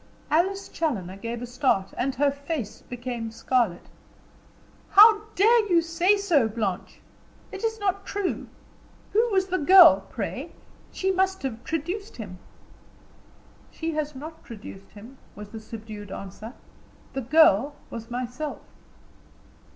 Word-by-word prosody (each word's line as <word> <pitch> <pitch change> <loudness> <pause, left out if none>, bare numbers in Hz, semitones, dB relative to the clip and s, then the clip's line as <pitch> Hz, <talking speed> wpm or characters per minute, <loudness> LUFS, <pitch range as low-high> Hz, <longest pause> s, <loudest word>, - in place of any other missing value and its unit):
Alice 380 +5 +1
Challoner 205 - -3
gave 230 +3 -5
a - - -3
start, 245 -6 0
and 265 +1 -1
her 280 +2 +2
face 280 -5 -5
became 245 -2 -5
scarlet. 230 -4 0 1.0
"How 425 +1 +7
dare 435 +2 +4
you 335 -1 +5
say 345 +5 +2
so, 340 - +2
Blanche? 210 -4 -4 0.5
It 390 - -8
is 445 0 -1
not 395 -1 -1
true. 400 -1 -3 0.7
Who 455 +3 +3
was 385 -2 +1
the 370 0 0
girl, 360 +3 +7
pray? - - -5 0.4
She 380 0 0
must 380 -1 0
have 235 -4 -4
traduced 350 +7 -4
him." 190 -6 -8 1.3
"She 330 0 -4
has 300 -2 -3
not 310 +4 -9
traduced 200 -3 -11
him," 230 +6 -13 0.2
was 210 0 -9
the 220 - -8
subdued 215 -2 -9
answer. 205 +6 -8 0.6
"The 270 - -2
girl 285 -1 +4 0.2
was 230 0 -7
myself." 250 +5 -5
280 Hz, 130 wpm, -25 LUFS, 225-375 Hz, 1.3 s, How